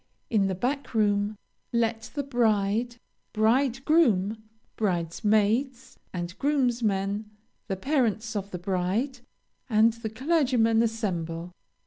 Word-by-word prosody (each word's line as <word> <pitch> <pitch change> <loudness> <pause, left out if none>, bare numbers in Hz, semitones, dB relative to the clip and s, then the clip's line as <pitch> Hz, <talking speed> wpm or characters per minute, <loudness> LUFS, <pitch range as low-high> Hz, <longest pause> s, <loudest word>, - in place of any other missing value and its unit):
In 205 -4 +3
the 190 - -1
back 260 +6 -3
room, 205 -1 +1 0.3
let 230 -1 0
the 285 - -1
bride, 230 -2 +1 0.4
bridegroom, 235 - +2 0.3
bridesmaids, 215 - 0
and 175 0 -5
groomsmen, 220 -7 0 0.4
the 195 - -1
parents 230 -3 0
of 200 -1 -3
the 180 - -5
bride, 195 +9 -1 0.5
and 220 0 +4
the 230 -1 -5
clergyman, 250 -3 +2
assemble. 180 -7 -2
220 Hz, 100 wpm, -27 LUFS, 200-245 Hz, 0.5 s, and